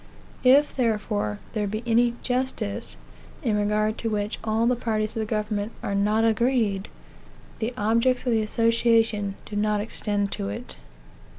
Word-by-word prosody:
If, 275 Hz, +3 st, +5 dB
therefore, 210 Hz, -, 0 dB, 0.2 s
there 210 Hz, -2 st, -1 dB
be 215 Hz, +3 st, -4 dB
any 235 Hz, +1 st, +3 dB
justice, 245 Hz, -, -2 dB, 0.5 s
in 220 Hz, -3 st, +1 dB
regard 210 Hz, +1 st, +1 dB
to 230 Hz, -, -2 dB
which 210 Hz, -1 st, -2 dB
all 225 Hz, +1 st, +1 dB
the 250 Hz, +1 st, +3 dB
parties 215 Hz, -3 st, -1 dB
to -, -, -4 dB
the 220 Hz, -, -1 dB
government 210 Hz, 0 st, -2 dB
are 200 Hz, -, -2 dB
not 210 Hz, +3 st, +2 dB
agreed, 225 Hz, -3 st, +1 dB, 0.7 s
the 225 Hz, +2 st, -1 dB
objects 230 Hz, +4 st, +2 dB
of 250 Hz, -, +1 dB
the 225 Hz, -1 st, +3 dB
association 225 Hz, -2 st, +2 dB
do 210 Hz, -, -8 dB
not 210 Hz, 0 st, +1 dB
extend 205 Hz, -1 st, -1 dB
to 100 Hz, -, -3 dB
it. 100 Hz, -, -7 dB
215 Hz, 155 wpm, -25 LUFS, 205-230 Hz, 0.7 s, If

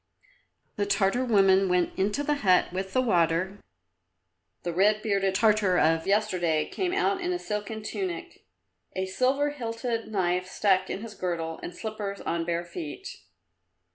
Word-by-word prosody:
The 205 Hz, -1 st, 0 dB
Tartar 200 Hz, +4 st, +2 dB
woman 195 Hz, -5 st, +4 dB
went 180 Hz, -1 st, +1 dB
into 205 Hz, +9 st, 0 dB
the 295 Hz, -, +1 dB
hut 185 Hz, -3 st, +3 dB
with 190 Hz, +1 st, -4 dB
the 255 Hz, -, +3 dB
water; 180 Hz, -1 st, +1 dB, 1.0 s
the 175 Hz, -, -2 dB
red 210 Hz, +4 st, +3 dB
bearded 195 Hz, -3 st, +1 dB
Tartar 210 Hz, -3 st, +3 dB
of 165 Hz, +1 st, +2 dB
yesterday 180 Hz, -7 st, +1 dB
came 370 Hz, -2 st, -2 dB
out 395 Hz, 0 st, +1 dB
in 355 Hz, 0 st, -1 dB
a 360 Hz, -, 0 dB
silken 210 Hz, -, -4 dB
tunic, 365 Hz, -, -5 dB, 0.5 s
a 190 Hz, -, -1 dB
silver 265 Hz, +9 st, +1 dB
hilted 230 Hz, -3 st, -3 dB
knife 185 Hz, -3 st, 0 dB
stuck 190 Hz, -1 st, +2 dB
in 200 Hz, -, -4 dB
his 225 Hz, -2 st, -8 dB
girdle 165 Hz, -4 st, -3 dB
and 175 Hz, -, -7 dB
slippers 210 Hz, -2 st, -5 dB
on 170 Hz, 0 st, -2 dB
bare 170 Hz, 0 st, -1 dB
feet. 170 Hz, -3 st, -7 dB
200 Hz, 150 wpm, -27 LUFS, 180-225 Hz, 1.0 s, woman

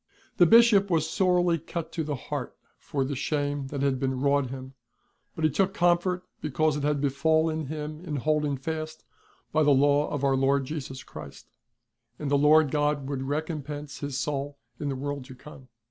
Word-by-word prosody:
The 175 Hz, -, +6 dB
Bishop 225 Hz, -2 st, +6 dB
was 160 Hz, -3 st, +2 dB
sorely 180 Hz, -1 st, +2 dB
cut 165 Hz, +1 st, -6 dB
to 165 Hz, -, -2 dB
the 150 Hz, -1 st, -2 dB
heart -, -, -5 dB, 0.2 s
for 135 Hz, -2 st, -2 dB
the 140 Hz, +1 st, -3 dB
shame 145 Hz, 0 st, -2 dB
that 140 Hz, 0 st, -3 dB
had 135 Hz, -2 st, +1 dB
been 130 Hz, -1 st, -1 dB
wrought 140 Hz, -1 st, +2 dB
him, 130 Hz, 0 st, -8 dB, 0.6 s
but 160 Hz, -, -5 dB
he 155 Hz, -, +5 dB
took 195 Hz, +6 st, +1 dB
comfort 175 Hz, 0 st, +2 dB, 0.2 s
because 155 Hz, +1 st, +1 dB
it 150 Hz, -, -3 dB
had 145 Hz, 0 st, +1 dB
befallen 155 Hz, +2 st, +1 dB
him 155 Hz, +2 st, -6 dB
in 155 Hz, -5 st, -4 dB
holding 150 Hz, 0 st, 0 dB
fast 155 Hz, +3 st, -5 dB, 0.5 s
by 155 Hz, -, +2 dB
the 150 Hz, -, +4 dB
Law 145 Hz, +1 st, +4 dB
of 145 Hz, -2 st, -3 dB
Our 135 Hz, -1 st, +3 dB
Lord 135 Hz, +1 st, +2 dB
Jesus 135 Hz, -2 st, -6 dB
Christ; -, -, -11 dB, 0.7 s
and 145 Hz, -2 st, -4 dB
the -, -, +4 dB
Lord 150 Hz, 0 st, +5 dB
God 145 Hz, -2 st, 0 dB
would 140 Hz, -2 st, -3 dB
recompense 150 Hz, 0 st, -4 dB
his 140 Hz, -2 st, -4 dB
soul 140 Hz, 0 st, -3 dB, 0.2 s
in 145 Hz, -, -2 dB
the 135 Hz, -, -2 dB
world 140 Hz, +1 st, -4 dB
to 130 Hz, 0 st, -11 dB
come. 135 Hz, -1 st, -13 dB
150 Hz, 185 wpm, -27 LUFS, 140-160 Hz, 0.7 s, The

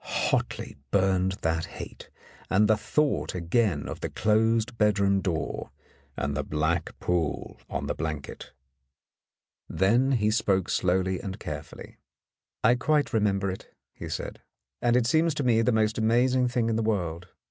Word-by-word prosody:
Hotly -, -, -2 dB
burned 95 Hz, +1 st, +2 dB
that 80 Hz, 0 st, 0 dB
hate, -, -, -9 dB, 0.4 s
and 105 Hz, +3 st, +4 dB
he 110 Hz, -, +5 dB
thought 145 Hz, +2 st, 0 dB
again 90 Hz, -2 st, 0 dB
of -, -, -6 dB
the -, -, -3 dB
closed 110 Hz, +2 st, +1 dB
bedroom 100 Hz, -2 st, +3 dB
door 85 Hz, -5 st, -3 dB, 0.5 s
and 70 Hz, 0 st, -2 dB
the 70 Hz, -, 0 dB
black 80 Hz, +4 st, -1 dB
pool 85 Hz, -4 st, -2 dB
on -, -, -3 dB
the -, -, -1 dB
blanket. 75 Hz, -3 st, -5 dB, 1.2 s
Then 120 Hz, +8 st, +3 dB
he 105 Hz, -3 st, +2 dB
spoke 95 Hz, -4 st, +1 dB
slowly 95 Hz, 0 st, +1 dB
and 95 Hz, -1 st, -6 dB
carefully. -, -, -8 dB, 0.7 s
"I -, -, +6 dB
quite 145 Hz, +3 st, +1 dB
remember 100 Hz, -3 st, +1 dB
it," 95 Hz, -, -10 dB, 0.2 s
he -, -, -8 dB
said, -, -, -5 dB, 0.4 s
"and 120 Hz, 0 st, +3 dB
it 125 Hz, -2 st, +3 dB
seems 160 Hz, +5 st, +2 dB
to 145 Hz, -, -1 dB
me 115 Hz, -3 st, +3 dB
the 125 Hz, -, +2 dB
most 110 Hz, -1 st, +1 dB
amazing 125 Hz, +3 st, +3 dB
thing 120 Hz, -2 st, 0 dB
in 115 Hz, -1 st, 0 dB
the -, -, +1 dB
world. 90 Hz, -6 st, -2 dB
105 Hz, 150 wpm, -27 LUFS, 90-115 Hz, 1.2 s, I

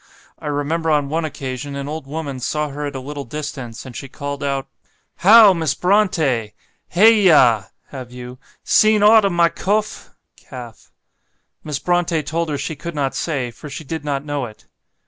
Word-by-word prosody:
I -, -, -7 dB
remember 150 Hz, +3 st, -1 dB
on 145 Hz, -2 st, +1 dB
one 160 Hz, +2 st, -1 dB
occasion 140 Hz, -1 st, -5 dB
an 140 Hz, 0 st, -5 dB
old 150 Hz, -2 st, -6 dB
woman 140 Hz, -3 st, -5 dB
saw 150 Hz, +4 st, -2 dB
her 145 Hz, +1 st, -4 dB
at 140 Hz, -, -7 dB
a -, -, -3 dB
little 140 Hz, +2 st, -6 dB
distance, 135 Hz, -4 st, -7 dB
and 130 Hz, -2 st, -10 dB
she 135 Hz, -, -7 dB
called 140 Hz, +1 st, -6 dB
out, 140 Hz, -1 st, -2 dB, 0.5 s
'How! 210 Hz, +1 st, +8 dB
Miss 160 Hz, -5 st, -1 dB
Brontë! 160 Hz, -, +1 dB, 0.3 s
Hey 215 Hz, +4 st, +5 dB
yah 125 Hz, -, +5 dB, 0.2 s
(have 130 Hz, -3 st, -9 dB
you) 125 Hz, 0 st, -9 dB, 0.2 s
seen 215 Hz, -1 st, +4 dB
ought 215 Hz, 0 st, +7 dB
o' -, -, +3 dB
my 170 Hz, -2 st, +3 dB
cofe 210 Hz, +4 st, -2 dB, 0.3 s
(calf)?' 120 Hz, -3 st, -11 dB, 0.7 s
Miss 150 Hz, -2 st, -3 dB
Brontë 175 Hz, -2 st, 0 dB
told 165 Hz, +2 st, -2 dB
her 145 Hz, -, -2 dB
she 145 Hz, +3 st, -4 dB
could 170 Hz, +3 st, -7 dB
not 140 Hz, -2 st, -1 dB
say, 135 Hz, -7 st, -2 dB
for 130 Hz, +6 st, -11 dB
she 160 Hz, -, -7 dB
did 160 Hz, +1 st, -5 dB
not 145 Hz, -1 st, -3 dB
know 145 Hz, -4 st, -3 dB
it. 110 Hz, -, -16 dB
145 Hz, 180 wpm, -20 LUFS, 135-170 Hz, 0.7 s, How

